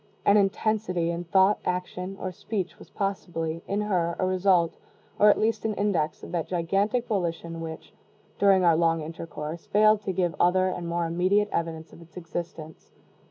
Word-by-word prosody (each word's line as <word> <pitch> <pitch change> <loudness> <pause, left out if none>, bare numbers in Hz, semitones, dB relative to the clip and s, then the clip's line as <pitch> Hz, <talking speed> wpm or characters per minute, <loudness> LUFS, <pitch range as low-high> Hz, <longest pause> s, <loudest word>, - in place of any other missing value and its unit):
An 200 - +6
intensity 195 -3 +1
in 170 +1 -4
thought, 190 +3 +4
action, 180 +1 -3
or 185 - -3
speech 190 0 -4
was - - -14
possibly, 165 -5 -3
in 200 +1 -1
her, 175 -5 0
a 185 - 0
result, 185 -2 +2 0.4
or 210 - +7
at - - +4
least 225 +1 0
an 220 -1 -1
index, 190 -7 -1
of - - -8
that 170 -3 -2
gigantic 195 +7 0
volition 170 -5 -3
which, 160 -1 -8 0.5
during 195 -2 +5
our 170 -2 +5
long 165 0 +2
intercourse, 160 0 -7
failed 215 0 +4
to 200 - -2
give 175 -2 0
other 185 +1 +3
and 175 -2 -4
more 170 0 -1
immediate 185 +5 +2
evidence 160 -1 -3
of - - -13
its 165 +1 -16
existence. 165 -2 -7
180 Hz, 170 wpm, -26 LUFS, 165-200 Hz, 0.5 s, or